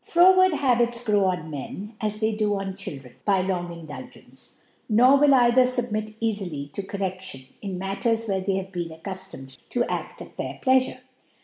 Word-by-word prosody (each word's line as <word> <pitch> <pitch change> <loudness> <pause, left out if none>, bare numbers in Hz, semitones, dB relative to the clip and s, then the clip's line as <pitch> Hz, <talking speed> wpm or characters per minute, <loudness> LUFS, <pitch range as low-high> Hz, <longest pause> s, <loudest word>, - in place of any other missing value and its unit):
Froward 370 +1 +6
Habits 240 -4 +2
grow 205 -3 +3
on 180 -4 -1
Men, 190 - -6
as 210 -1 -2
they 220 0 +2
do 210 -1 +1
oh - - -1
ChiWreni 190 -10 -7
by 195 -2 +2
tong 175 -2 -2
Indulgence; 145 -5 -11 0.3
nor 245 +5 +6
will 295 - +5
ciftlher 245 -3 +6 0.2
fubmit 215 -2 -2
eiffly 185 -11 -3
to - - -3
Corrcdlion 190 -8 -5
in 195 -3 -4
Matters 200 +5 -1
where 195 -3 0
they 190 +1 0
have 190 0 -4
been 175 -3 -3
accuftomed 160 -6 -8
to 245 - +1
aft - - -4
at' - - -16
their - - -5
Plicafure. 260 -1 +3
200 Hz, 170 wpm, -25 LUFS, 180-230 Hz, 0.3 s, Froward